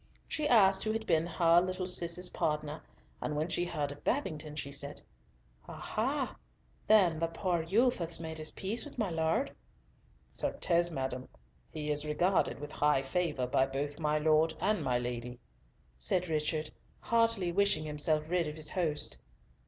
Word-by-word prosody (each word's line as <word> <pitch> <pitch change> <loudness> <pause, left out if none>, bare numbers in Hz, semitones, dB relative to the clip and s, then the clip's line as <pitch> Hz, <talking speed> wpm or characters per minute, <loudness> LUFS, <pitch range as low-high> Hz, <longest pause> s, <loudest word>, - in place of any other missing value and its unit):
She 305 -1 -1
asked 195 -6 +5
who 215 - 0
had 220 0 -3
been 165 -3 +2
"her 170 0 +4
little 185 0 -2
Cis's 180 0 +2
partner," 150 -2 -2 0.4
and 150 - -2
when 155 +3 -1
she 175 - 0
heard 150 -4 -2
of 145 - -11
Babington, 155 - -2
she 140 -2 -4
said, 140 +1 -4 0.7
"Ah - - -7
ha, - - -2 0.5
then, 190 -7 +5
the 165 - +1
poor 170 +1 -1
youth 220 +10 +2
has 170 -1 -2
made 160 -1 -6
his 155 - -4
peace 205 +5 -3
with 295 - -11
my 215 -6 0
Lord?" 165 - +1 0.8
"Certes, 170 -1 0
madam, 130 -4 -4 0.4
he 150 -1 -3
is 150 0 +1
regarded 175 +5 +1
with 145 +1 -7
high 145 -2 +2
favour 150 -2 -1
by 130 +1 +2
both 145 +2 -3
my 150 -1 +1
Lord 155 +1 +3
and 210 +2 +1
my 125 -1 +1
Lady," 120 0 -4 0.6
said 180 - 0
Richard, 155 0 -1 0.3
heartily 230 -6 +2
wishing 200 -4 +2
himself 150 0 +1
rid 175 -1 +1
of 150 - -5
his 155 -1 -3
host. 160 -5 -1
160 Hz, 165 wpm, -32 LUFS, 150-180 Hz, 0.8 s, asked